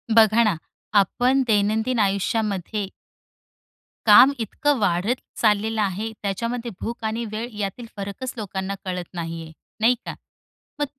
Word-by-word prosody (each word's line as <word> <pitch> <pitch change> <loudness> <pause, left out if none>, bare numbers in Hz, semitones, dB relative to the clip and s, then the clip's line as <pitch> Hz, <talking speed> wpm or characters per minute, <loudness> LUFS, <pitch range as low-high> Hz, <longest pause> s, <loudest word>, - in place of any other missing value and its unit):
बघा 225 +1 +6
ना, 215 -5 +2 0.4
आपण 250 +7 +2
दैनंदिन 220 +3 +2
आयुष्यामध्ये, 200 0 0 1.2
काम 240 +6 +8
इतकं 280 +4 0
वाढत 200 +4 +1 0.3
चाललेलं 215 0 +2
आहे, 205 +3 -1
त्याच्यामध्ये 230 +4 -2
भूक 235 0 -5
आणि 225 +2 -1
वेळ 220 +2 -3
यातील 205 +4 -3
फरकच 200 +6 -5
लोकांना 195 -2 -3
कळत 180 -2 -4
नाहीये, 165 -2 -5 0.3
नाही 230 +3 +4
का. - - -5 0.6
मग 290 - +2
215 Hz, 120 wpm, -23 LUFS, 195-230 Hz, 1.2 s, काम